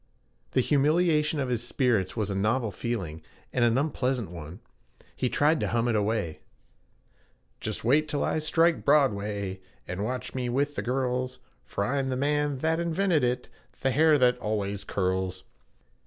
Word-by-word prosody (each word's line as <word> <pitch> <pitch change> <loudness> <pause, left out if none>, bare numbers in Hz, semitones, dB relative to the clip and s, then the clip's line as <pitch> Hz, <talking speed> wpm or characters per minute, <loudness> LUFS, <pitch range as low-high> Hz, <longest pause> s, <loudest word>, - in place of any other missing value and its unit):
The 130 - +4
humiliation 150 +2 +2
of 130 -2 -1
his 120 -2 -1
spirits 120 -6 0
was 105 -2 -1
a - - -2
novel 110 +3 +1
feeling 95 -7 -4 0.3
and 125 - +2
an 120 +1 +3
unpleasant 130 - -1
one; 85 +2 -8 0.6
he 125 - 0
tried 150 +4 +3
to - - 0
hum 115 0 +1
it 120 - +1
away: 105 -6 -1 1.2
'Just - - -4
wait 145 +7 +3
till 150 -2 -1
I - - 0
strike 165 +2 +2
Broadway 100 -9 +1 0.3
And 90 +3 -3
watch 125 +3 -4
me 125 -2 -2
with 140 +4 0
the - - -3
girls, 125 0 -1 0.3
For 100 - -2
I'm 135 +2 0
the 130 - -1
man 145 +1 +1
that 160 +1 +2
invented 170 -2 +1
it 125 0 0 0.3
The 135 - +2
hair 155 +3 +5
that 125 -2 +3
always 100 -2 -2
curls.' 95 -1 -1
125 Hz, 160 wpm, -27 LUFS, 105-145 Hz, 1.2 s, hair